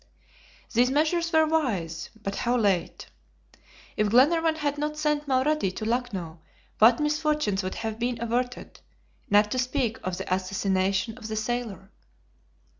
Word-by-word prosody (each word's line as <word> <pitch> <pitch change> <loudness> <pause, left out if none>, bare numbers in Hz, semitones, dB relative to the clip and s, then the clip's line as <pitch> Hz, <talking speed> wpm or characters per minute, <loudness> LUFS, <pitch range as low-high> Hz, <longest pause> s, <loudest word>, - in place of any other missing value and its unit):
These 245 +2 +4
measures 320 +4 +1
were 315 0 +5
wise, 220 - -1
but 195 0 -3
how 245 +1 +1
late! 200 -6 0 0.9
If 210 -1 +1
Glenarvan 315 +7 +4
had 290 -2 -2
not 300 +1 -2
sent 300 -1 0
Mulrady 270 -3 +1
to 215 - -4
Lucknow 210 -9 -3 0.4
what 230 +2 +6
misfortunes 300 -8 0
would 185 0 -4
have 225 -1 -4
been 240 0 -1
averted, 245 +2 -3 0.5
not 210 +1 +4
to 255 - 0
speak 250 -3 -1
of 185 -1 -3
the - - -2
assassination 190 +3 -1
of 220 - -7
the 220 - -4
sailor! 215 -3 -4
240 Hz, 140 wpm, -26 LUFS, 200-295 Hz, 0.9 s, what